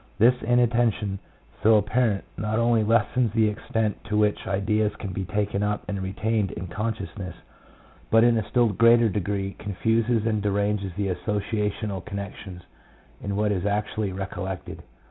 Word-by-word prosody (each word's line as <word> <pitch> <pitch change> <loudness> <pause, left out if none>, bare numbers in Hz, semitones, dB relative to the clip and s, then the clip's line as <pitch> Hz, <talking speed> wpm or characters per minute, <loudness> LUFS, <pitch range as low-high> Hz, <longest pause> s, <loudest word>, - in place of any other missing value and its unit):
This 115 +5 +6
in 120 +2 +2
attention, 115 -5 +1 0.4
so 110 +1 +6
apparent, 105 0 +2
not 105 +1 -2
only 115 -1 +3
lessens 115 +1 +2
the 110 -1 +3
extent 105 0 -2
to 105 0 -1
which 105 -1 +1
ideas 105 +2 0
can 100 -3 -6
be 95 +1 -3
taken 105 +1 -1
up 105 0 -1
and 100 -1 -3
retained 100 +2 -1
in - - -6
con 105 +6 -2
sciousness, 95 -2 -7 0.7
but 115 0 +5
in 120 -1 +5
a 110 -3 -2
still 120 -3 +3
greater 115 +2 +5
degree 100 0 -2
confuses 110 +3 0
and 110 -2 +1
deranges 100 -1 0
the 100 -1 0
associational 105 0 -2
connections 100 -2 -7 0.6
in 100 0 -3
what 105 0 +1
is 95 -3 -1
actually 105 0 -1
recollected. 95 -1 -5
105 Hz, 155 wpm, -25 LUFS, 100-110 Hz, 0.7 s, This